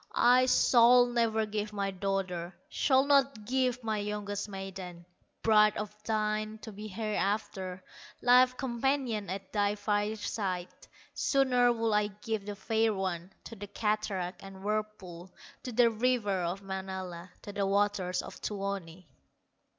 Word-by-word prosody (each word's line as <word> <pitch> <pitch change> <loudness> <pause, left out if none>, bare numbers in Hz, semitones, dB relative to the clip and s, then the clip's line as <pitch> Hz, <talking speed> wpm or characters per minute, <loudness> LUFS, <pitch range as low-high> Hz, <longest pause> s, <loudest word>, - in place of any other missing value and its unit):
I 250 +1 +5
shall 245 0 +6
never 230 -2 +1
give 210 0 -4
my 200 -1 -1
daughter, 190 -2 -3
Shall 265 -2 +3
not 275 -6 +2
give 255 0 0
my 220 -1 -1
youngest 205 0 -3
maiden 190 -3 -7 0.4
Bride 215 -1 +5
of 210 0 -5
thine 215 0 -1
to 220 - -7
be 210 +1 -8
hereafter, 195 -3 -2 0.4
Life 250 +1 +5
companion 245 -5 -1
at 190 0 -6
thy 205 -1 +1
fireside. 205 -3 -2 0.4
Sooner 250 -3 +3
would 230 -1 0
I 210 0 +3
give 210 0 -5
the 205 - -4
fair 220 +2 +1
one 185 -1 -3
To 230 - -9
the 205 0 -8
cataract 205 -4 -2
and 195 -1 -11
whirlpool, 205 -4 -4 0.3
To 250 - -6
the 235 0 +4
river 215 -5 +1
of 185 +4 -3
Manala, 190 -2 -6
To 205 - -8
the 200 -1 0
waters 200 -2 +1
of - - -10
Tuoni!" 195 -4 -4
210 Hz, 135 wpm, -30 LUFS, 195-225 Hz, 0.4 s, shall